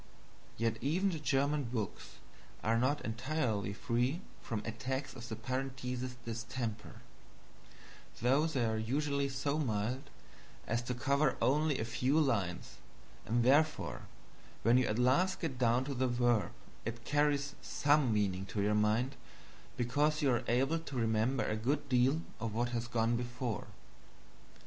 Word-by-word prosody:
Yet 115 0 0
even 180 +8 +1
the 165 - -3
German 145 0 +1
books 115 -4 -4 0.5
are 115 +1 +2
not 140 +4 +1
entirely 115 -4 -1
free 120 - 0 0.2
from 105 -2 -3
attacks 130 +4 -3
of 120 -1 -9
the 110 - -3
Parenthesis 130 +1 -3
distemper 115 -1 -5 1.2
though 135 +6 +3
they 135 -7 0
are 110 -1 0
usually 140 +4 0
so 140 +2 -1
mild 125 +2 -1 0.6
as 115 +2 0
to 125 +1 -3
cover 140 +3 +2
only 150 +1 +2
a 110 - -2
few 130 +6 +1
lines, 100 - 0 0.5
and 120 +1 +2
therefore 150 +5 +2 0.6
when 120 +3 +5
you 130 - +1
at 105 - 0
last 135 +10 +3
get 140 -7 -3
down 120 +1 +3
to 140 - -3
the 130 0 +1
verb 120 -3 +2 0.3
it 115 +1 -5
carries 145 -1 +1
some 145 -4 +2
meaning 95 -3 0
to 105 - -4
your 105 +1 +2
mind 110 +5 +2 0.6
because 150 +6 +1
you 135 - +4
are 120 0 +1
able 135 +7 +2
to 140 -5 -6
remember 115 +3 +1
a 110 - 0
good 140 +6 -1
deal 130 +6 +3 0.2
of 110 -1 -3
what 120 +1 +1
has 120 0 -2
gone 115 -1 +1
before. 120 -2 -3
125 Hz, 145 wpm, -34 LUFS, 115-140 Hz, 1.2 s, when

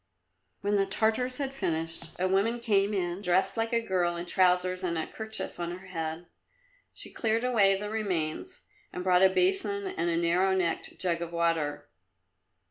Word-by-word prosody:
When 205 +1 +1
the 195 0 +1
Tartars 225 +5 0
had 270 -2 -3
finished, 165 -8 -2
a 185 - +1
woman 200 +6 +1
came 205 -3 +2
in 180 -2 -2
dressed 190 +1 +2
like 225 0 -1
the 235 -1 +1
girl 185 -6 0
in 170 0 -5
trousers 185 0 +2
and 170 -2 -1
a 160 - -2
kerchief 220 -4 -1
on 175 +1 -4
her 190 - -14
head. 160 -1 -4 0.7
She - - -4
cleared 225 0 0
away 205 -6 +3
the 210 +1 -5
remains, 205 - -3 0.3
and 180 - -5
brought 180 -1 +4
a 190 - +7
basin 390 - +1
and 375 - -2
a 165 - 0
narrow 180 +3 +2
necked 180 -3 -2
jug 170 -2 +3
of 170 -1 -5
water. 160 -4 -1
190 Hz, 175 wpm, -28 LUFS, 170-220 Hz, 0.7 s, a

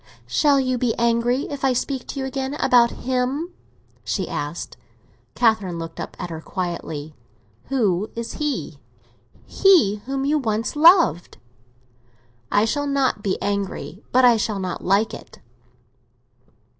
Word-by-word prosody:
"Shall 280 - +3
you 255 -2 0
be 240 -2 0
angry 235 +3 +1
if 285 -1 -6
I 265 -1 +3
speak 260 +1 -3
to - - -5
you 265 - -2
again 265 +1 -3
about 240 -5 +4
him?" 260 +8 -2 0.5
she - - -2
asked. - - -5 0.6
Catherine 220 -7 +2
looked 165 0 -7
up - - -6
at 180 -2 -6
her 160 -1 -6
quietly. 160 -5 -5 0.5
"Who 210 -7 0
is 230 0 -5
he?" 300 -2 -3 0.7
"He 335 - +4
whom 270 0 -2
you 300 +2 +2
once 225 -1 -2
loved." 325 - +5 1.1
"I 205 +1 +3
shall 290 +5 -1
not 275 -6 0
be 195 -2 -1
angry, 200 0 -3
but 255 0 +5
I 240 -2 +6
shall 215 -1 -1
not 185 -1 -4
like 200 +4 +2
it." - - -11
240 Hz, 140 wpm, -22 LUFS, 200-270 Hz, 1.1 s, I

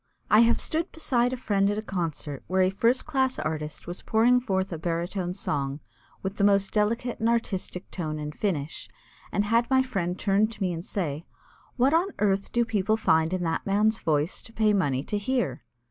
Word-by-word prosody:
I 210 - +7
have 235 0 +5
stood 320 +2 -1
beside 250 -6 +1
a 255 - -3
friend 200 -5 +1
at 205 - -1
a 215 - -3
concert 160 -8 -4
where 185 0 +2
a 185 - +2
first 230 +6 +2
class 265 -4 0
artist 155 -1 -4
was 175 +1 -5
pouring 235 +3 +4
forth 190 -5 -1
a 165 - -5
baritone 175 +2 -2
song 140 -6 -2 0.4
with 195 +1 -4
the 200 - +1
most 200 -1 +3
delicate 230 +4 0
and 225 - +2
artistic 195 -5 -2
tone 155 -4 -3
and 150 0 -5
finish, 160 -5 -3 0.4
and 205 - +1
had 230 +3 +2
my 260 0 +4
friend 190 -8 -2
turn 200 +2 +2
to 225 - -11
me 180 -2 0
and 165 0 -5
say: 160 -7 -3 0.5
"What 260 +4 +3
on 340 +4 +3
earth 200 -1 +1
do 235 0 +2
people 215 -1 +1
find 160 -6 +2
in 185 -1 -1
that 165 +3 -2
man's 215 +3 +2
voice 150 +1 0
to - - -12
pay 215 -2 +3
money 140 -9 +1
to 210 +5 -2
hear?" 205 - -1
200 Hz, 200 wpm, -26 LUFS, 170-230 Hz, 0.5 s, I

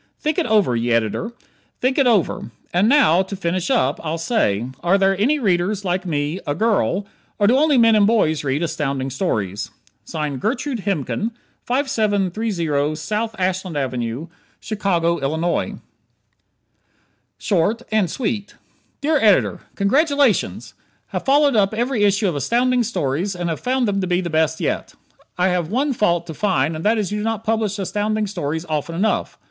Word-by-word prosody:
Think 305 -1 0
it - - 0
over, 210 - +3
ye 120 +1 0
Ed., 115 -2 +1 0.6
think 260 +3 +1
it 270 - +4
over. 210 - +1 0.2
And 190 +5 +3
now, 215 - +5
to 190 +1 -5
finish 180 -1 -2
up, 130 +3 +1
I'll 160 0 -2
say: 140 - 0 0.2
are 175 +3 +3
there 195 0 +3
any 285 +8 +3
readers 200 -3 0
like 180 +1 -1
me 150 +2 -1
a 145 - 0
girl 205 -1 +1 0.3
or 205 - +2
do 235 +5 +5
only 295 0 +4
men 230 -2 +5
and 205 -1 +5
boys 160 -10 +2
read 140 +3 -1
Astounding 135 -4 -2
Stories? 105 - -2 0.4
Gertrude 210 - -2
Hemken, 200 - -1 0.4
5730 205 - 0
So. 210 +9 -2
Ashland 185 -3 -1
Ave., 125 0 -3 0.3
Chicago, 175 -5 0
Ill. 160 +5 -1 1.6
Short 205 +4 0
and 215 -5 +2
Sweet 210 -1 -3 0.5
Dear 305 +2 +2
Editor: 210 -5 +3 0.2
Congratulations! 280 +3 +1 0.4
Have - - -4
followed 285 -1 +4
up 205 0 +2
every 240 -1 0
issue 205 +1 +3
of 175 - -1
Astounding 245 - +1
Stories 185 - -1
and 175 -1 -3
have 160 - -4
found 255 -1 0
them 200 -1 0
the 185 - -1 0.2
best 160 0 +1
yet. - - -2 0.4
I 180 +1 +3
have 175 -3 -1
one 270 +6 0
fault 175 -7 +1
to 165 - -7
find 165 -5 0
and 155 - -6
that 220 +2 +3
is 205 -2 -1
you 210 - -2
do - - -3
not 225 -1 -2
publish 220 -2 0
Astounding 210 +2 -1
Stories 160 -4 -3
often 155 0 -3
enough. 205 +6 0
195 Hz, 160 wpm, -21 LUFS, 160-225 Hz, 1.6 s, now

